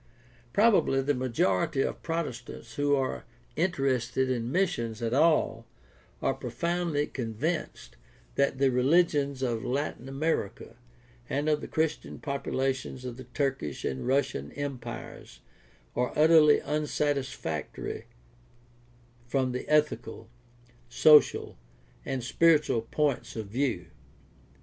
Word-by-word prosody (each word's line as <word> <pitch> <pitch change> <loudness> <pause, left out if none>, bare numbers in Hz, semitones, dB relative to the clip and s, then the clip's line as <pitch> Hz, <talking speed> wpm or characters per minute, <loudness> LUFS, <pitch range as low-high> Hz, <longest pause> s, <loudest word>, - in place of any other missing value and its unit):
Probably 200 - +4
the 145 +2 +1
majority 130 - +1
of - - -3
Protestants 125 -8 -5
who 145 +2 +2
are 135 -1 -2 0.3
interested 130 -6 0
in 120 -1 -2
missions 140 - 0
at 115 -1 -2
all 140 -6 +2 0.6
are - - +2
profoundly 160 +4 -1
convinced 130 - -4 0.4
that 140 -1 +1
the 135 0 +3
religions 140 0 +2
of 115 -3 -1
Latin 135 0 -3
America 135 -7 -2 0.5
and 145 +2 -1
of 150 -1 +2
the - - -6
Christian 160 -1 -2
populations 135 -2 -2
of 125 -2 -5
the 130 - -9
Turkish 130 - -2
and 65 - -3
Russian 130 - 0
empires 120 - -7 0.5
are 125 0 0
utterly 155 -1 +6
unsatisfactory 140 - -2 1.2
from 130 +1 0
the 125 - -5
ethical, 150 -6 0 0.6
social, 150 +5 +5 0.4
and 130 -2 -3
spiritual 150 -2 +3
points 145 +3 -1
of 110 -3 -5
view. 120 -6 -1
135 Hz, 105 wpm, -28 LUFS, 120-150 Hz, 1.2 s, utterly